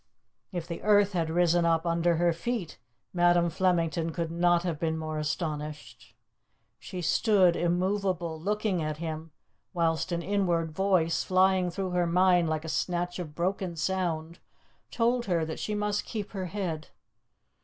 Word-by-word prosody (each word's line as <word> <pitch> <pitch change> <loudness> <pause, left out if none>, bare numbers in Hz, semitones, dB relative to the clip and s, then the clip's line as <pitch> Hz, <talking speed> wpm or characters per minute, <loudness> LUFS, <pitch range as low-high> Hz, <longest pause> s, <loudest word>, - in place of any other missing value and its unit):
If 175 -3 -4
the 170 - -6
earth 205 -1 +4
had 165 -3 0
risen 175 +1 +3
up 165 0 +2
under 170 0 +2
her 170 +1 +2
feet 190 0 -4 0.3
Madam 175 -1 +3
Flemington 165 -2 +1
could 165 -1 -3
not 175 0 +2
have 170 -4 -2
been 160 -1 -1
more 155 -1 -4
astonished. 150 -1 -5 0.6
She 180 -1 -7
stood 190 -2 +4
immovable, 180 -2 -1
looking 205 -1 0
at 155 -1 -3
him, 160 0 -5 0.5
whilst 165 0 0
an 170 0 -1
inward 175 -5 0
voice, 180 -2 +1
flying 185 -1 +3
through 185 +2 -3
her 175 -1 +1
mind 180 -1 +3
like 155 0 -2
a - - -5
snatch 175 +2 -2
of 155 -4 -6
broken 180 +1 -2
sound, 170 -2 -2 0.5
told 240 +1 +1
her 170 -4 +1
that 160 - -5
she 210 - -2
must 210 0 -1
keep 210 -3 -5
her 190 -3 -4
head. 170 -5 -4
175 Hz, 155 wpm, -28 LUFS, 165-190 Hz, 0.6 s, earth